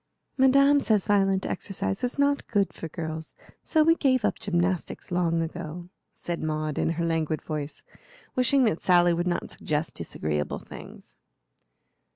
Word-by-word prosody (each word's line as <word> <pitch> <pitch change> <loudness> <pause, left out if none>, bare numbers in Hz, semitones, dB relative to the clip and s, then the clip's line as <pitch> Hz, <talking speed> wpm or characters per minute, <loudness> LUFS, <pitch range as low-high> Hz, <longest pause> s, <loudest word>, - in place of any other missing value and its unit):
"Madame 275 +2 +5
says 215 -7 +1
violent 195 -2 +2
exercise 195 +2 -3
is 245 +2 -1
not 280 0 +1
good 200 -3 +1
for 165 - -6
girls, 160 0 -6 0.3
so 315 -2 +2
we 330 +1 +5
gave 260 -8 +2
up - - 0
gymnastics 180 -5 -1
long 170 -2 +1
ago," 165 +2 -7 0.2
said 170 -1 -5
Maud, 155 -1 -2
in - - +1
her 170 +1 -2
languid 160 -2 -1
voice, 150 -2 -5 0.5
wishing 255 +2 +3
that 215 -8 +1
Sally 175 -1 +4
would 175 +1 -1
not 175 - -2
suggest 155 +1 -2
disagreeable 75 -1 -3
things. - - -12
175 Hz, 150 wpm, -26 LUFS, 160-235 Hz, 0.5 s, Madame